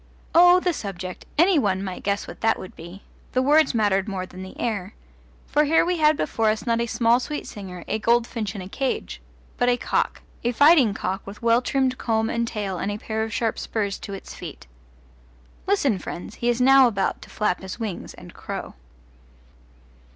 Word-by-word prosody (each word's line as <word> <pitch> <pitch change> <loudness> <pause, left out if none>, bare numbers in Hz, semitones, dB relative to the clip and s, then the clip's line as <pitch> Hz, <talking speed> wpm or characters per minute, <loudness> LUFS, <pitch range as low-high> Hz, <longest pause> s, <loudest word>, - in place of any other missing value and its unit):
Oh, 355 +1 +7
the 360 -1 0
subject! 185 - -6
Any 345 +1 +5
one 195 -5 0
might 185 -2 -5
guess 200 0 -1
what - - -10
that 225 0 +3
would 185 - -10
be. 170 +4 -11 0.3
The 255 - +2
words 295 0 +4
mattered 205 -2 +2
more 190 -3 -3
than 185 0 -11
the 190 0 -10
air. 210 -3 -3 0.5
For 300 +1 +2
here 325 +3 +4
we 355 0 0
had 305 -1 +4
before 225 -1 +1
us 215 +2 -1
not 230 -1 +1
a 235 - -1
small 235 +1 +3
sweet 295 +3 -5
singer, 185 -4 -8
a 220 - -1
goldfinch 230 -2 0
in 195 - -5
a - - -8
cage, 265 +6 -3 0.4
but 245 - +2
a 245 - +3
cock - - -1 0.2
a 240 +1 0
fighting 285 -6 +5
cock 190 +1 -2
with 205 +3 -10
well 230 +1 +4
trimmed 260 -1 0
comb 225 -1 0
and 235 0 -1
tail 200 -5 -3
and 200 - -2
a 205 - -3
pair 220 +1 -3
of 220 0 -2
sharp 225 0 -1
spurs 205 -3 -2
to 200 - -6
its 195 - -10
feet. - - -9 1.0
Listen, 285 - +2
friends, 175 - -7
he 240 - 0
is 240 0 +1
now 265 +1 +7
about 200 -5 -1
to - - -12
flap 210 -4 0
his 190 +4 -8
wings 215 -6 -5
and - - -13
crow. - - -6
225 Hz, 200 wpm, -24 LUFS, 195-255 Hz, 1.0 s, Oh